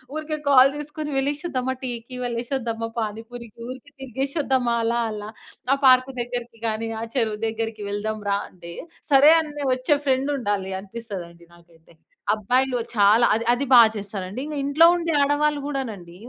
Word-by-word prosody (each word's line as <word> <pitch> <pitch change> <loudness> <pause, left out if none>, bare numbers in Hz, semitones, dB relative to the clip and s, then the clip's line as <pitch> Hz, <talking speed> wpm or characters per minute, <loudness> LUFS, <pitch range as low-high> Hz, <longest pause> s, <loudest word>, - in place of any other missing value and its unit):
ఊరికే 310 0 -3
కాల్ 270 0 +7
చేసుకొని, 295 +1 -6
"వెళ్ళేసొద్దామా 270 -2 -1
టీకి? 245 0 -6
వెళ్ళేసొద్దామా 235 -1 -3
పానిపూరికి? 225 +1 -6
ఊరికే 260 +3 -10
తిరిగేసొద్దామా 265 -1 -1
అలా 235 +1 +1
అలా? 210 0 -6 0.4
ఆ - - +4
పార్కు 255 0 +6
దగ్గరకి 240 -1 -6
గానీ, 225 +1 -2
ఆ - - -3
చెరువు 220 -4 0
దగ్గరికి 225 -1 -4
వెళ్దాం 215 +1 -3
రా" 200 - +2
అంటే, 170 -2 -12 0.4
సరే 280 +3 +8
అనె 295 -2 -6
ఒచ్చే 255 +3 +1
ఫ్రెండుండాలి 255 -8 0
అనిపిస్తదండి 190 -6 -9
నాకైతే. 170 -1 -22 0.4
అబ్బాయిల్లో 250 +4 +1 0.2
చాలా 210 +4 +5
అది, 225 +2 -1
అది 260 +3 -1
బా 245 - +10 0.2
చేస్తారండి. 200 0 -6
ఇంగ 305 - -6
ఇంట్లో 290 +4 +5
ఉండే 335 -1 -2
ఆడవాళ్ళు 290 +1 +1
గూడానండి, 225 -12 -5
240 Hz, 140 wpm, -23 LUFS, 215-275 Hz, 0.4 s, బా